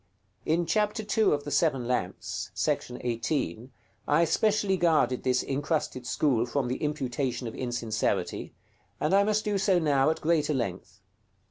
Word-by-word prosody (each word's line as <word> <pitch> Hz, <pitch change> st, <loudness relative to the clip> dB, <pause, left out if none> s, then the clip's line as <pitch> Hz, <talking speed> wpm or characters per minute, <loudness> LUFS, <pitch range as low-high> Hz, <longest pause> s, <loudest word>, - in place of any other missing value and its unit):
In 170 Hz, +2 st, +2 dB
chapter 210 Hz, +4 st, 0 dB
ii. 220 Hz, -3 st, +4 dB
of 145 Hz, -1 st, 0 dB
the 145 Hz, -, -6 dB
"Seven 135 Hz, -8 st, +1 dB
Lamps," 120 Hz, -8 st, -3 dB
§ 125 Hz, -, -1 dB
18, 120 Hz, -, -2 dB, 0.4 s
I 150 Hz, +3 st, +4 dB
especially 205 Hz, +3 st, +2 dB
guarded 160 Hz, -7 st, +2 dB
this 125 Hz, -1 st, +1 dB
incrusted 140 Hz, -3 st, -2 dB
school 130 Hz, -3 st, +1 dB
from 130 Hz, 0 st, -1 dB
the 130 Hz, -, -1 dB
imputation 130 Hz, -4 st, -2 dB
of 115 Hz, -, -6 dB
insincerity, 120 Hz, -3 st, -2 dB, 0.4 s
and 150 Hz, -, 0 dB
I 200 Hz, +1 st, +6 dB
must 215 Hz, +1 st, 0 dB
do 205 Hz, -2 st, 0 dB
so 190 Hz, -1 st, +3 dB
now 145 Hz, -4 st, +3 dB
at 160 Hz, -, -1 dB
greater 155 Hz, -2 st, +1 dB
length. 95 Hz, -4 st, -4 dB
145 Hz, 150 wpm, -28 LUFS, 125-170 Hz, 0.4 s, I